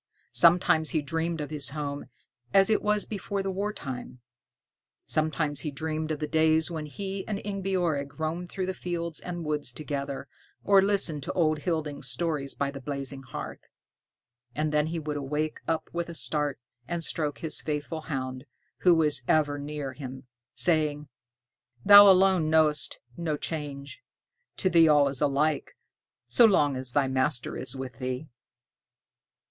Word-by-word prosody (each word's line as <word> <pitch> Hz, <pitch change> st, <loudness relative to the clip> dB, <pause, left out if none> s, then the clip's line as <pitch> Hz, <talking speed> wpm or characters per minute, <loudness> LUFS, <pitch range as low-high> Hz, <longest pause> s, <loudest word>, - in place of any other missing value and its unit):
Sometimes 170 Hz, -2 st, +5 dB
he 155 Hz, -, +1 dB
dreamed 165 Hz, +2 st, -2 dB
of 150 Hz, -, -5 dB
his 145 Hz, -3 st, -3 dB
home 145 Hz, 0 st, -4 dB, 0.5 s
as 195 Hz, +2 st, +6 dB
it 215 Hz, -, +3 dB
was 210 Hz, 0 st, +1 dB
before 200 Hz, -1 st, -3 dB
the 195 Hz, -, -2 dB
wartime. 185 Hz, -11 st, -5 dB, 0.9 s
Sometimes 155 Hz, -2 st, -1 dB
he 155 Hz, -, -3 dB
dreamed 155 Hz, +2 st, -3 dB
of 155 Hz, -, -1 dB
the 150 Hz, -, -3 dB
days 160 Hz, +2 st, +2 dB
when 155 Hz, -2 st, -4 dB
he 195 Hz, +6 st, -5 dB
and 210 Hz, -, -2 dB
Ingebjorg 180 Hz, -8 st, -1 dB
roamed 165 Hz, +3 st, -3 dB
through 190 Hz, 0 st, -3 dB
the 190 Hz, -, -2 dB
fields 170 Hz, -3 st, -4 dB
and 175 Hz, -2 st, -6 dB
woods 150 Hz, -4 st, -1 dB
together, 140 Hz, -1 st, -4 dB, 0.4 s
or 200 Hz, -1 st, +6 dB
listened 195 Hz, -7 st, +1 dB
to -, -, -4 dB
old 155 Hz, -3 st, +2 dB
Hilding's 150 Hz, -4 st, -3 dB
stories 140 Hz, +1 st, -1 dB
by 140 Hz, 0 st, -1 dB
the 140 Hz, -1 st, -8 dB
blazing 140 Hz, -1 st, -5 dB
hearth; 130 Hz, -1 st, -7 dB, 1.0 s
and 155 Hz, 0 st, 0 dB
then 150 Hz, 0 st, +2 dB
he 165 Hz, +1 st, -3 dB
would 150 Hz, -2 st, -3 dB
wake 150 Hz, +3 st, -2 dB
up 160 Hz, -1 st, -1 dB
with 170 Hz, 0 st, -3 dB
a 170 Hz, -, -7 dB
start 150 Hz, -3 st, -1 dB, 0.3 s
and 170 Hz, -1 st, -3 dB
stroke 150 Hz, -3 st, -2 dB
his 160 Hz, -2 st, -2 dB
faithful 150 Hz, +1 st, -3 dB
hound, 130 Hz, -3 st, -4 dB, 0.3 s
who 180 Hz, -2 st, +5 dB
was 150 Hz, -5 st, +2 dB
ever 145 Hz, -2 st, +2 dB
near 145 Hz, -2 st, -5 dB
him, 130 Hz, -2 st, -8 dB, 0.3 s
saying, 150 Hz, -3 st, +1 dB, 0.8 s
"Thou 205 Hz, 0 st, +10 dB
alone 185 Hz, -4 st, +5 dB
knowest 155 Hz, -2 st, +2 dB, 0.2 s
no 160 Hz, -3 st, -1 dB
change; 145 Hz, -3 st, -6 dB, 0.6 s
to 190 Hz, -, 0 dB
thee 170 Hz, -2 st, +6 dB
all 145 Hz, -2 st, +5 dB
is 135 Hz, -2 st, -2 dB
alike, 145 Hz, +1 st, 0 dB, 0.5 s
so 240 Hz, -, +6 dB
long 150 Hz, -10 st, +4 dB
as 130 Hz, -1 st, -3 dB
thy 140 Hz, -2 st, +3 dB
master 130 Hz, 0 st, 0 dB
is 130 Hz, -, -5 dB
with 130 Hz, -2 st, -7 dB
thee." 130 Hz, +2 st, -3 dB
155 Hz, 155 wpm, -28 LUFS, 140-170 Hz, 1.0 s, Thou